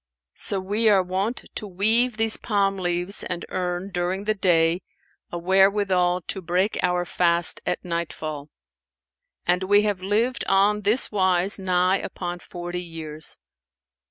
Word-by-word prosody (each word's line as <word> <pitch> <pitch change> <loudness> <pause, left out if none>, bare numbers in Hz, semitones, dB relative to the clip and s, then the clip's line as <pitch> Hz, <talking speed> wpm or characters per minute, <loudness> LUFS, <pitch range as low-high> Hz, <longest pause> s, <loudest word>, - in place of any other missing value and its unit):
So 200 - -1
we 210 +4 +1
are 195 -3 +4
wont 190 +6 -2
to 210 - -4
weave 220 +6 +1
these 225 0 +2
palm 200 -3 0
leaves 175 +1 -2
and 175 -1 -4
earn, 180 +1 -3
during 180 +2 -2
the 215 +1 +1
day, 175 -3 +2 0.5
a 175 - -3
wherewithal 190 0 +3
to 190 - -5
break 180 +4 0
our 180 0 +1
fast 170 -1 +1
at 180 - -2
nightfall; 155 -3 -4 1.0
and 180 +1 +2
we 205 +2 +4
have 205 -3 -1
lived 225 +6 0
on 200 +2 +3
this 210 +5 +2
wise 190 -1 +2
nigh 185 0 +2
upon 175 -1 -5
forty 175 0 -6
years. 160 -3 -4
185 Hz, 140 wpm, -24 LUFS, 175-205 Hz, 1.0 s, are